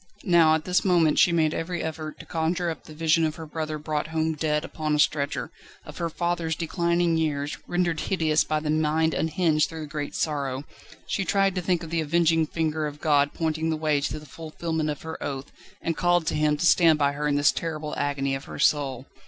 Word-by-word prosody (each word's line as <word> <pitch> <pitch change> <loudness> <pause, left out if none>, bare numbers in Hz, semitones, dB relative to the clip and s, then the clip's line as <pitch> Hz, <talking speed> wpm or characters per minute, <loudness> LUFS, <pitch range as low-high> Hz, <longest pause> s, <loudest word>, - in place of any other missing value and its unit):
Now, 165 -3 +5
at 160 - -3
this 180 0 +2
moment, 170 -5 +3
she 175 - +6
made 160 -2 +2
every 170 +1 -3
effort 155 -1 -5
to - - -10
conjure 170 +1 -1
up 160 - -9
the 155 - -11
vision 165 +1 +2
of 155 -1 0
her 160 - -8
brother 155 0 -4
brought 150 0 -2
home 160 0 0
dead 150 0 -1
upon 155 -2 -2
a - - +1
stretcher, 150 -1 0 0.3
of - - -10
her 170 -1 -1
father's 170 -1 -1
declining 170 0 +1
years, 145 -2 -1
rendered 175 -2 0
hideous 160 -5 +1
by 155 0 -1
the 150 -1 -1
mind 155 +1 +1
unhinged 160 -1 +1
through 160 -1 -7
the - - -5
great 145 -1 -5
sorrow. 140 -3 -2 0.4
She 195 - -1
tried 195 0 +2
to 180 - -2
think 175 -1 0
of 165 - -8
the 165 -1 +1
avenging 165 0 +2
finger 155 -1 -1
of 150 0 -8
God 145 -2 +3
pointing 160 0 -1
the 160 - 0
way 155 -2 +1
to 150 - -2
the 150 - -10
fulfilment 160 0 -4
of 150 - -5
her 160 0 -7
oath, 135 0 -5 0.3
and 165 - -1
called 175 -2 +2
to - - -1
Him 150 0 +2
to 160 - -1
stand 165 -2 +5
by 140 -1 +2
her 150 +1 -2
in 145 - +1
this 145 0 +4
terrible 155 -2 -4
agony 140 -1 -1
of 135 +1 -4
her - - -8
soul. 135 -4 +1
155 Hz, 220 wpm, -25 LUFS, 150-165 Hz, 0.4 s, she